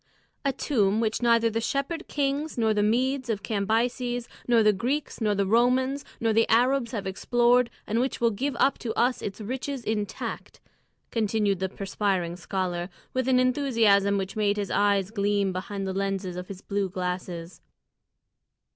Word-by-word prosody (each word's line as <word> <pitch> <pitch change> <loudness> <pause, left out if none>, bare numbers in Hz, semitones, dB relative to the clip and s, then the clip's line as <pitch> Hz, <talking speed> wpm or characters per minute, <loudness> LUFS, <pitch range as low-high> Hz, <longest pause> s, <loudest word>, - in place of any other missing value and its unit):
"A 275 - +2
tomb 220 -6 +1
which 220 0 0
neither 230 -1 +4
the 225 +1 -1
Shepherd 280 +8 -2
Kings 285 +1 -1
nor 220 -2 +2
the 210 - +1
Medes 255 +4 +1
of 210 -3 -2
Cambyses 235 +3 -1 0.2
nor 235 -2 +5
the 210 0 +5
Greeks 255 +8 -2
nor 210 -2 +2
the 200 0 +1
Romans 255 +6 +2 0.2
nor 225 -1 +1
the 225 +1 +3
Arabs 245 +1 +3
have 210 -5 -4
explored, 240 +5 +2 0.2
and 225 +2 0
which 260 +2 -1
will 235 -1 +3
give 265 +7 -2
up 275 - +2
to 225 -3 -4
us 245 +1 +1
its 200 +1 -5
riches 260 +4 -4
intact," 210 -2 -4 0.5
continued 210 -3 +1
the 190 0 -1
perspiring 195 -3 -1
scholar, 180 -1 -3 0.2
with 260 0 0
an 255 -1 +4
enthusiasm 230 -7 +3
which 195 +2 -3
made 205 -1 +1
his 205 -2 -2
eyes 200 -1 +2
gleam 200 -2 +1
behind 195 +2 -4
the 190 - -2
lenses 195 -2 -2
of 180 0 -6
his 195 -1 -8
blue 200 -1 -1
glasses. 180 -2 -5
220 Hz, 165 wpm, -26 LUFS, 195-250 Hz, 0.5 s, nor